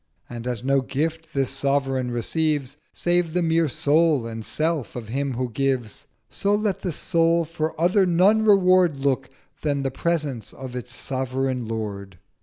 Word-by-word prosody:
And, 120 0 -7
as 120 -2 -3
no 135 +1 +3
gift 160 +4 -3
this 135 -2 +1
Sovereign 135 -2 0
receives 140 +3 -1 0.2
Save 175 -2 0
the 180 - +2
mere 165 -1 +2
Soul 150 -1 +2
and 115 -1 -6
Self 155 -3 -2
of 115 -3 -6
him 135 +2 -1
who 125 0 -2
gives, 130 -3 -2 0.2
So 200 - 0
let 205 -2 0
that 180 - -3
Soul 165 +2 +2
for 160 -1 -3
other 185 +3 +3
none 190 +6 +4
Reward 185 -6 +5
Look 135 -1 0 0.3
than 145 -2 0
the 135 - -1
Presence 145 - -2
of 130 -2 -8
its 125 -1 -5
Sovereign 130 -1 -2
Lord.' 100 -4 -5
140 Hz, 160 wpm, -24 LUFS, 125-165 Hz, 0.3 s, Reward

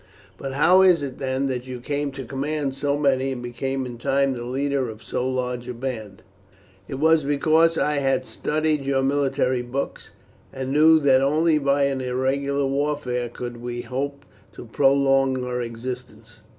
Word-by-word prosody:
"But 135 -1 -6
how 175 +7 +5
is 180 -5 +5
it, 135 -2 -6
then, 130 0 -1
that 130 -1 -3
you 125 -1 -6
came 145 +3 -2
to 135 -1 -7
command 140 +2 -2
so 140 +1 -1
many, 135 -2 +1
and 120 -1 -7
became 135 +2 -3
in 120 -2 -8
time 135 +2 +1
the 120 - -6
leader 135 +1 -1
of 110 0 -10
so 125 +1 -2
large 125 -1 -3
a 125 - -5
band?" 115 -6 -6 0.6
"It - - -5
was 160 +2 +3
because 160 +3 +3
I 150 -1 +1
had 135 -2 +1
studied 155 0 -1
your 135 -1 +1
military 135 -2 +1
books, 125 +3 -5 0.4
and 130 0 -4
knew 160 +2 +6
that 135 -2 +4
only 155 +3 +3
by 140 0 +2
an 135 -1 0
irregular 135 +2 0
warfare 135 -3 -1
could 120 0 -7
we 120 0 -5
hope 140 +3 -4 0.3
to - - -10
prolong 135 +1 +2
our 125 0 -2
existence. 115 -1 -7
135 Hz, 170 wpm, -23 LUFS, 125-140 Hz, 0.6 s, knew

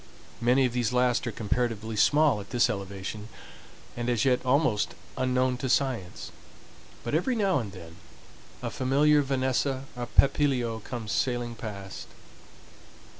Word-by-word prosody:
Many 125 +3 +4
of 125 - -1
these 120 -1 0
last 125 +1 +2
are - - -1
comparatively 110 0 -2
small 145 -1 +4
at 100 - -12
this 120 0 +3
elevation, 100 +1 -6 0.7
and 120 0 -2
as 120 -1 +1
yet 125 -2 +2
almost 130 -5 +1 0.2
unknown 130 0 +1
to 130 +1 -3
science; 120 -9 -1 0.7
but 120 - -4
every 180 - +1
now 195 -8 +2
and 105 -5 -5
then 85 -4 -11 0.7
a - - -2
familiar 145 +3 +3
vanessa 130 0 0
or 120 -1 -4
papilio 130 -5 +2
comes 110 -1 -6
sailing 120 -2 0
past. 100 -4 -7
125 Hz, 135 wpm, -28 LUFS, 110-135 Hz, 0.7 s, Many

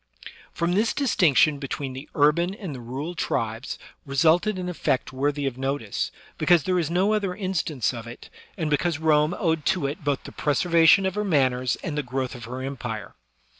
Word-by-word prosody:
From 170 +1 -1
this 215 +4 +2
distinction 155 - +3
between 135 -1 -4
the 135 +3 -9
urban 170 +6 +3
and 195 - -6
the 125 - -8
rural 135 +8 -5
tribes 115 -7 -2 0.3
resulted 165 +9 +2
an 180 -1 -4
effect 130 -7 -1
worthy 145 +2 -1
of 130 -2 -3
notice, 135 -5 -2 0.3
because 175 -4 +4
there 185 +2 +1
is 160 -3 -1
no 185 +5 +2
other 200 -4 -1
instance 180 - -1
of 115 -1 -7
it, 120 - -11 0.3
and 160 -4 -1
because 150 +2 +1
Rome 155 +1 +3
owed 160 -3 0
to 185 -6 +1
it 145 +2 -4
both 145 -2 -1
the - - -9
preservation 165 +5 +4
of 190 - 0
her 210 +1 -1
manners 130 - +2
and 160 -5 -3
the 150 - 0
growth 130 -1 -3
of 120 -3 -8
her 130 +2 -6
empire. 120 -6 -5
150 Hz, 185 wpm, -25 LUFS, 130-175 Hz, 0.3 s, because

